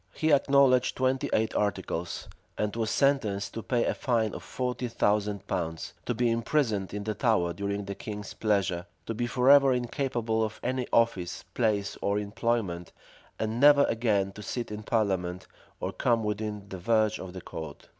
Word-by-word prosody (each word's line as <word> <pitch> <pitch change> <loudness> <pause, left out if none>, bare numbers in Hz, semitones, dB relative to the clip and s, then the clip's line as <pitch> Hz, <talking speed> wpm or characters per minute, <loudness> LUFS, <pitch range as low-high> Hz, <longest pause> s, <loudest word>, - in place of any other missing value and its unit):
He 155 -1 +2
acknowledged 135 -3 +4
twenty 130 +2 +1
eight 110 0 +1
articles; 95 -4 -2 0.3
and 105 0 -1
was 115 -2 -1
sentenced 115 -8 +1
to 115 - -4
pay 120 +1 0
a - - +1
fine 115 -4 0
of - - -6
forty 125 -1 -3
thousand 105 -3 0
pounds, 80 -5 -3
to 120 - 0
be 120 +1 +2
imprisoned 115 -4 0
in 105 0 -4
the 110 +1 -2
Tower 105 -7 +1
during 100 +1 -3
the 100 - -4
king's 105 0 -7
pleasure, 100 -5 0 0.2
to 115 - -3
be 120 +2 -2
forever 135 +2 +6
incapable 120 -3 -1
of 110 0 -4
any 125 0 -1
office, 105 -7 +1
place, 105 -4 0
or 100 0 +1
employment, 105 -4 -2 0.5
and 110 +2 -2
never 145 +1 +7
again 105 -6 +1
to 105 - -10
sit 120 +3 -4
in 105 0 -5
parliament, 95 -5 -1 0.3
or - - -2
come 115 -2 +1
within 105 -1 -3
the 95 - -6
verge 110 +2 +2
of 95 -1 -7
the 95 - -7
court. 80 -3 -8
110 Hz, 170 wpm, -28 LUFS, 100-120 Hz, 0.5 s, never